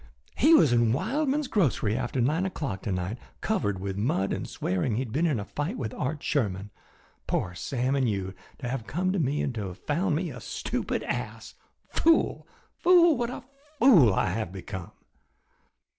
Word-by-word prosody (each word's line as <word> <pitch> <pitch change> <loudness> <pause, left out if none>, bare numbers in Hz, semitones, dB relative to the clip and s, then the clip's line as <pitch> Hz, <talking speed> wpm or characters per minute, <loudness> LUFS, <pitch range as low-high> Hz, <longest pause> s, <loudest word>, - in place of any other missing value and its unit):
He 315 +6 +6
was 145 - +5
in 120 -1 +4
at 115 - +2
Wildman's 285 - 0
grocery 135 - +1
after 125 +1 -2
nine 150 +9 +2
o'clock 135 - -4
to 105 - -3
night 90 +6 -3 0.2
covered 140 - -1
with 95 0 -4
mud 100 -4 0
and - - -4
swearing 95 +6 -1
he 120 - 0
had 120 - -8
been 160 +8 +1
in 140 -8 0
a 100 - -5
fight 145 +7 -3
with 110 -5 -4
Art 140 +3 -3
Sherman. 100 -6 -1 0.6
Poor 90 - -1
Sam 130 +8 -1
and 130 -4 +2
you 95 -2 -3 0.2
to 130 - -5
have 120 -2 -4
come 185 +5 0
to 195 - 0
me 145 -1 0
and 135 - -2
to 105 -4 -4
have 90 0 -8
found 170 +2 0
me 170 +2 -2
a - - -8
stupid - - -3
ass! - - -4 0.3
Fool! 330 0 +2 0.3
Fool! 345 -3 +6
What 240 -2 -1
a - - -7 0.3
fool 200 - +7
I - - +1
have 105 -3 -3
become!" 95 -1 -7
130 Hz, 190 wpm, -27 LUFS, -, 0.6 s, fool